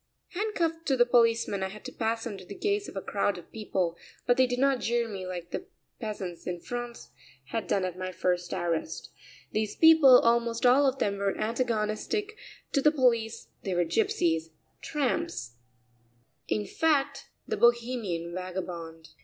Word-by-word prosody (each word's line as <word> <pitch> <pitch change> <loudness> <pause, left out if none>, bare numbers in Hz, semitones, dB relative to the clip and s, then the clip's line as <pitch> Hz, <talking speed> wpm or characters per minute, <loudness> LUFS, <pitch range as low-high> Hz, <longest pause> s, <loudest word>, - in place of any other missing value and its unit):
Handcuffed 335 -5 -2
to 270 - +2
the 240 - +6
policeman 230 -4 +3
I 190 - 0
had 210 +2 -11
to - - -5
pass 225 0 -2
under 200 -5 -6
the 200 - -9
gaze 410 0 0
of - - -12
a 195 - -4
crowd 200 -1 0
of 175 - -13
people, 190 -6 -2 0.3
but 245 - +4
they 260 0 +4
did 245 0 -2
not 270 0 +3
jeer 235 0 0
me 195 -4 -6
like 175 -1 -6
the 370 - -5 0.3
peasants 195 -6 -5
in 175 -1 -3
France 240 - -6 0.4
had 225 +4 -3
done 190 -2 +1
at 180 0 -5
my 185 0 -3
first 180 -1 -1
arrest; 170 - -2 0.4
these 215 -1 -1
people, 320 -6 +8
almost 235 0 +2
all 270 +3 +6
of 265 0 0
them, 200 -4 0
were 200 -1 0
antagonistic 230 - -1 0.4
to 280 - +2
the 300 - +5
police; 235 -5 +1
they 190 -2 -2
were 175 0 +2
gypsies, 165 -3 +1 0.3
tramps, 190 - -2 0.9
in 105 -1 -1
fact, 300 - 0 0.2
the - - -1
Bohemian 235 -8 +1
vagabond. 175 -3 -6
225 Hz, 165 wpm, -28 LUFS, 185-255 Hz, 0.9 s, people